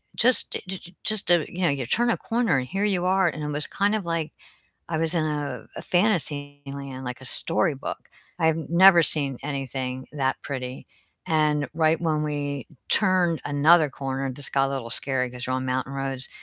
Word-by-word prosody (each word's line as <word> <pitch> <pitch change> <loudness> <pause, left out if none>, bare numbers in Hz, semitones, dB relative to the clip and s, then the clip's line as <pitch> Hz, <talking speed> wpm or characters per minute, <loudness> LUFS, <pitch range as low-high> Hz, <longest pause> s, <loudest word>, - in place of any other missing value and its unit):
just 250 +1 +5 0.2
j 185 -1 -6
just 215 -3 +2
a 170 -2 +4
you 180 +1 -5
know, 170 - +4
you 135 -3 -1
turn 240 0 +2
a - - 0
corner, 230 - 0
and 125 - -5
here 195 +2 -1
you 185 -4 +1
are, 190 0 +3
and 150 0 -6
it - - -3
was 150 +1 0
kind 205 +2 0
of 200 -5 -3
like 165 -2 -2 0.6
I 160 - -1
was 165 +1 0
in 160 - +1
a 150 -2 -4
a - - -6
fantasy 150 -7 +1
land, 140 -2 -7
like 125 +1 -6
a - - -10
storybook. 160 0 -1 0.3
I've 160 -1 +1
never 175 -1 +7
seen 140 -4 +3
anything 130 -2 -4
that 135 -2 -1
pretty, 130 -2 -6 0.4
and 150 -2 +1
right 160 0 +2
when 155 -2 0
we 145 -3 -3 0.2
turned 180 -6 +2
another 150 +2 +4
corner 135 -1 -4
this 140 +1 0
got 135 0 +2
a - - -4
little 120 -4 -4
scary 130 0 0
'cause 125 0 -7
you're 130 - 0
on 130 0 -3
mountain 130 +1 -2
roads, 135 -1 +2
150 Hz, 195 wpm, -24 LUFS, 135-170 Hz, 0.6 s, never